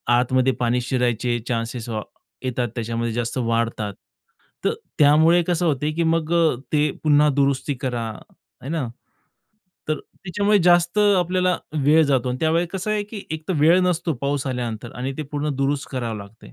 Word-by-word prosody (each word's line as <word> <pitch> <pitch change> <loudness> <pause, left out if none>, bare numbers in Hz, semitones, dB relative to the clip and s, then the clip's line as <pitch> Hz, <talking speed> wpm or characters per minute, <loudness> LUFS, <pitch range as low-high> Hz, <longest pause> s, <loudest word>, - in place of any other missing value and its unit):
आतमध्ये 130 +1 +2
पाणी 120 +1 +1
शिरायचे 120 -1 0
चान्सेस 115 0 -3
अ, 110 -1 -2 0.4
येतात, 125 -1 -1
त्याच्यामध्ये 115 0 -2
जास्त 120 +2 -2
वाढतात, 115 -3 -1 0.7
तर - - +3 0.3
त्यामुळे 160 +4 +5
कसं 175 0 +1
होते, 150 0 0
की 170 +2 -1
मग 165 0 +1
अ, 165 -5 +3 0.2
ते 150 0 +3
पुन्हा 150 0 +5
दुरुस्ती 140 0 +1
करा. 120 -3 -2 0.5
है 135 - -6
ना? 155 -7 -1 1.0
तर 155 - 0
त्याच्यामुळे 205 +3 0
जास्त 175 +2 +4 0.2
आपल्याला 180 +1 +1 0.3
वेळ 155 +2 +6
जातो 130 -3 +1
आणि 125 +1 -2
त्यावेळेला 165 +2 +2
कसं 210 +3 -3
आहे, 210 -1 +1
की 205 -1 -8
एकतर 160 +3 -3
वेळ 165 +4 +6
नसतो 175 -2 0
पाऊस 140 -1 -1
आल्यानंतर 120 -2 -4
आणि 130 +2 -3
ते - - -1
पूर्ण 145 +1 -1
दुरुस्त 140 +1 -1
करावे 115 -4 -3
लागते. 100 - -13
140 Hz, 160 wpm, -22 LUFS, 120-165 Hz, 1.0 s, वेळ